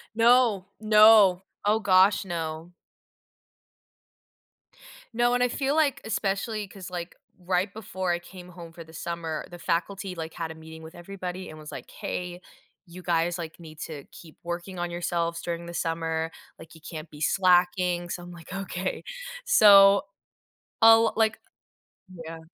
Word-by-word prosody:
No, 230 -4 +4
no, 215 -3 +6 0.2
oh 215 +2 +3
gosh, 190 0 +4
no. 165 -1 -5 2.4
No, 240 +1 +2
and 245 - +2
I - - +4
feel 270 +3 -1
like, 300 -4 +2
especially 210 0 -2
'cause, 190 -1 -10
like, 175 -1 -6 0.2
right 185 +2 0
before 190 -4 -4
I 175 - 0
came 180 0 -13
home 170 -2 -11
for 165 - -10
the 160 0 -17
summer, 165 -2 -4
the 175 0 -11
faculty, 185 +3 -2
like, 160 -1 -6
had 165 -1 -5
a 160 - -9
meeting 160 0 -12
with 160 +2 -12
everybody 185 0 -7
and 155 0 -11
was, 150 - -10
like, - - -9
"Hey, 180 0 -5 0.4
you 180 +1 -11
guys, 170 0 0
like, 165 0 -7
need 155 -2 -12
to 150 -4 -7
keep 160 -2 -14
working 175 +2 -5
on 175 0 -3
yourselves 170 -1 -2
during 170 0 -4
the 170 - -8
summer, 165 -1 -2 0.3
like, 160 +1 -13
you 160 - -16
can't 160 -1 -8
be 150 0 -12
slacking." 180 0 +2
So 175 - -5
I'm, 175 - -10
like, 170 0 -11
"Okay." 190 -1 -4 0.4
So, 200 - +7 0.8
I'll, 225 0 +7
like 220 -1 +2 0.7
Yeah. 165 -2 -9
175 Hz, 155 wpm, -26 LUFS, 165-195 Hz, 2.4 s, So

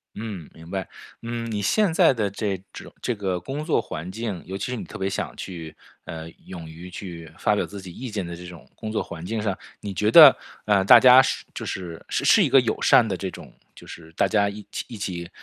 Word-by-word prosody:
嗯， 105 -8 -7
明 80 +1 -14
白， 95 -2 -3 0.3
嗯， 115 0 -4
你 105 -1 -2
现 195 - +2
在 - - +5
的 110 -5 -1
这 100 -1 -2 0.2
种 - - -10
这 125 - -1
个 95 -3 -2
工 135 - -5
作 155 - +1
环 80 +4 -7
境， 110 -3 -4
尤 95 +1 -5
其 100 - -4
是 - - -2
你 115 - -5
特 - - -9
别 95 - -2
想 100 - -4
去， 80 -4 -8 0.3
呃， 80 0 -7 0.2
勇 85 -3 -8
于 85 +3 -10
去 85 -4 -9
发 105 - +2
表 - - 0
自 100 - -9
己 95 -2 -10
意 125 +8 -7
见 105 -4 -3
的 85 0 -6
这 90 +1 -10
种 90 -1 -12
工 110 -1 -6
作 110 - -1
环 80 -1 -9
境 110 +5 -3
上， 100 -3 -1 0.2
你 100 -1 -6
觉 105 +3 +1
得， 150 +1 +10 0.3
呃， 100 -2 +3
大 - - +9
家 130 0 +9
是 130 - -2
就 - - -6
是 85 -3 -6
是 - - +4
一 - - +1
个 - - +7
友 - - -2
善 - - +5
的 - - -2
这 - - -4
种 - - -12 0.2
就 - - -14
是 80 -1 -11
大 95 - +2
家 100 +2 +2
一 105 +1 -9 0.2
一 115 - -9
起 85 -4 -5
100 Hz, 255 characters per minute, -24 LUFS, 85-110 Hz, 0.3 s, 得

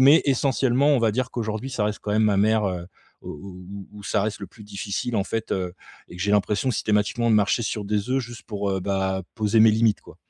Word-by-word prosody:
mais 140 +5 +7
essentiellement, 135 0 +2
on 145 -3 +4
va 115 -2 +2
dire, 130 +1 -1
qu'aujourd'hui 110 +2 -3
ça 115 -4 -1
reste 105 0 -1
quand 105 - -4
même 110 - +3
ma 105 -2 +3
mère, 110 +1 +3
heu, 90 -2 -3 0.3
où - - -10
où 95 +3 -9
où 105 -1 -11
ça 105 0 0
reste 105 0 -3
le 100 - -5
plus 105 -3 -14
difficile 100 +3 -4
en 100 - +2
fait, 115 0 -3
heu, 90 -1 -2 0.3
et - - -11
que 90 - -4
j'ai 100 - 0
l'impression 105 +5 +2
systématiquement 105 +2 +1
de - - +5
marcher 105 +3 +2
sur 105 -1 -3
des 105 +2 -1
œufs 135 +1 +2
juste 120 0 -9
pour, 100 -2 -3
heu, 95 -1 -1
bah, 95 0 -1
poser 110 0 +3
mes 110 0 +8
limites 110 -1 +2
quoi. - - -15
105 Hz, 245 wpm, -24 LUFS, 100-115 Hz, 0.3 s, mes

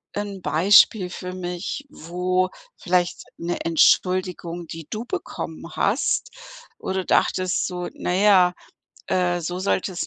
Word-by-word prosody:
'n 200 -2 -4
Beispiel 185 +3 +5
für 180 0 -6
mich, 180 +9 -5
wo 180 - -1 0.3
vielleicht 180 -2 0
'ne 175 +1 -3
Entschuldigung, 175 +1 +2
die 165 -1 -8
du 220 +3 -4
bekommen 375 +5 -6
hast, - - +1 0.5
wo - - -4
du 190 -1 -1
dachtest 185 -1 +1
so: 180 -1 -4
„Na 180 - -3
ja, 185 -3 +5 0.6
äh, 175 -1 +1
so 175 +2 -4
sollte 190 0 0
es 175 - -3
180 Hz, 130 wpm, -23 LUFS, 175-190 Hz, 0.6 s, Beispiel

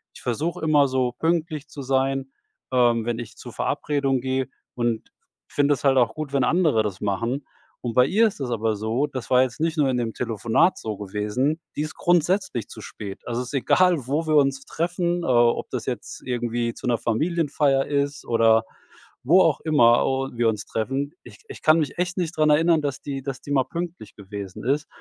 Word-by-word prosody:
Ich - - -12
versuche 150 +9 -2
immer 145 -3 +4
so 130 -1 +1
pünktlich 160 -2 -1
zu 140 - -8
sein 135 0 0 0.4
ähm, 120 -2 +3
wenn 120 0 -2
ich 120 - -8
zur - - -9
Verabredung 140 -3 0
gehe, 130 0 -1 0.3
und 120 -2 -1 0.4
finde 145 0 +2
es 125 - -12
halt 135 -2 +4
auch 120 -3 +3
gut, 155 -2 -5
wenn 135 -2 +2
andere 155 -7 +3
das 100 -3 -4
machen. 115 +7 -2 0.4
Und 120 -2 -3
bei 125 0 +6
ihr 220 +8 +4
ist 200 - -6
es 125 -2 -3
aber 110 -1 0
so, 110 +7 -1
das 130 -3 -7
war 125 0 +6
jetzt 125 +2 -4
nicht 160 0 0
nur 145 -3 +3
in 130 - 0
dem 115 -2 -2
Telefonat 115 - +1
so 110 -2 -5
gewesen, 105 - -1 0.2
die - - 0
ist 155 - -6
grundsätzlich 175 - +1
zu - - -10
spät. 100 -2 -8
Also, 120 +1 -2
es 125 - -6
ist - - -10
egal, 170 0 +3
wo 155 +4 -1
wir 155 - +2
uns 135 -1 +2
treffen, 175 +1 -1
äh, - - -3
ob 120 -2 +3
das - - -3
jetzt - - -5
irgendwie 120 -1 -1
zu - - -9
'ner 120 - +2
Familienfeier 145 +1 +1
ist 140 0 -1
oder 115 -1 +3 0.6
wo 175 +8 +6
auch 155 -5 +3
immer 120 -7 +4
o 135 0 -1
wir 120 -1 +1
uns 105 -2 -3
treffen. 135 +6 -2
Ich - - -14
ich - - -9
kann 155 +1 +5
mich 150 - -2
echt 180 0 -1
nicht 170 -3 -2
dran 155 0 +4
erinnern, 160 +1 +4
dass 140 -2 -3
die 135 -1 -5
dass 135 -1 -5
die 145 - -8
mal 135 -2 +3
pünktlich 170 -5 -6
gewesen 100 -2 -8
ist. 145 +3 0
135 Hz, 205 wpm, -24 LUFS, 120-155 Hz, 0.6 s, bei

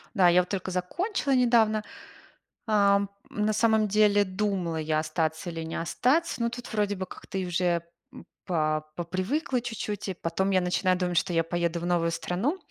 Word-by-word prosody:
Да, 185 -4 +6
я 175 +1 +5
вот 180 - -7
только 190 -1 -3
закончила 275 - -1
недавно, 230 -4 +3 0.8
ам. 200 -2 +3 0.2
На 210 +1 0
самом 220 0 +3
деле 205 0 +4
думала 185 -3 -2
я 155 0 0
остаться 160 +2 -2
или 165 -1 -5
не 160 - -6
остаться, 255 - 0
но 235 - +2
тут 240 +1 -8
вроде 205 -1 +1
бы 185 -1 -4
как-то 190 - -7
уже, 175 -2 0 0.3
м, - - -11 0.2
по 155 -4 0
попривыкла 190 - -1
чуть-чуть. 215 -4 -4
И 190 - -2
потом 180 +3 -1
я 185 -1 +3
начинаю 180 +1 +1
думать, 180 -1 -1
что 175 - -1
я 165 -1 +3
поеду 170 0 -1
в 175 - -4
новую 170 -1 +1
страну, 190 - -1
185 Hz, 175 wpm, -27 LUFS, 170-215 Hz, 0.8 s, Да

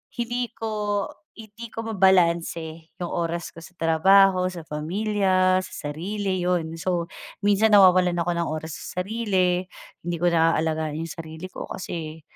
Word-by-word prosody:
hindi 240 +1 -2
ko 210 -2 -2 0.3
hindi 220 +1 -11
ko 225 - -4
mabalanse 170 -6 +1
yung 175 - -2
oras 170 0 -2
ko - - -22
sa 165 +3 -11
trabaho, 185 +3 +4
sa 170 - -7
pamilya, 185 +3 +1
sa 145 - -6
sarili 190 +5 -3
yun, 165 -2 -1
so 170 0 -2 0.3
minsan 205 +1 +3
nawawalan 185 -2 +6
ako 175 0 -1
ng 170 - 0
oras 155 0 -5
sa 180 - -4
sarili, 185 -4 0 0.4
hindi 175 0 -1
ko 175 - +4
naalagaan 160 -2 +1
yung 165 - -5
sarili 160 +3 -8
ko - - -7
kasi 160 -3 -6
180 Hz, 145 wpm, -24 LUFS, 165-200 Hz, 0.4 s, nawawalan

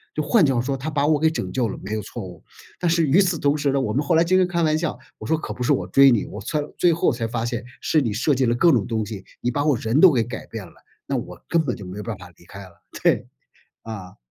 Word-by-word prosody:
就 155 - -1
换 210 +1 +4
句 135 - +2
话 120 - +1
说 135 +2 -2
她 140 +5 -4
把 145 -2 0
我 150 0 +3
给 160 +1 +3
拯 95 - -4
救 125 -3 0
了， - - -6
没 95 - -7
有 110 - -2
错 110 +2 -7
误， 90 -3 -10 0.4
但 175 - +1
是 165 0 +3
与 155 +8 +4
此 180 -3 +1
同 145 0 +1
时 145 -2 0
呢， 140 - +1
我 105 - -1
们 130 - +1
后 160 - +1
来 165 - +5
经 185 +2 +2
常 185 - +3
开 170 -1 -1
玩 155 -1 +2
笑， 170 -1 -2 0.2
我 - - -8
说 160 - +2
可 - - -6
不 - - -11
是 125 - +3
我 90 - -1
追 135 +8 +6
你， 120 -5 +2
我 - - -8
才 155 - -2 0.2
最 175 -1 +4
后 165 - +2
我 - - 0
才 115 -1 -3
发 115 0 -3
现 120 0 -4 0.2
是 155 - +2
你 115 -7 -1
设 135 +7 +1
计 130 0 +1
了 120 0 +1
各 170 +7 +5
种 115 -8 +1
东 110 -2 -1
西， 105 -3 -8 0.2
你 120 - 0
把 145 +4 -1
我 150 -3 +3
人 115 +7 0
都 185 - +9
给 120 - +2
改 120 - -7
变 110 -4 -7
了， 85 - -16 0.3
那 - - -2
我 - - -6
根 165 -1 +2
本 125 - -1
就 100 -5 -10
没 90 - -8
有 105 - -5
办 110 -3 -5
法 90 -1 -12
离 85 - -21
开 100 +3 -11
了， 90 -3 -17 0.2
对， - - +2 0.6
啊。 100 -5 -8
130 Hz, 335 characters per minute, -22 LUFS, 110-155 Hz, 0.6 s, 都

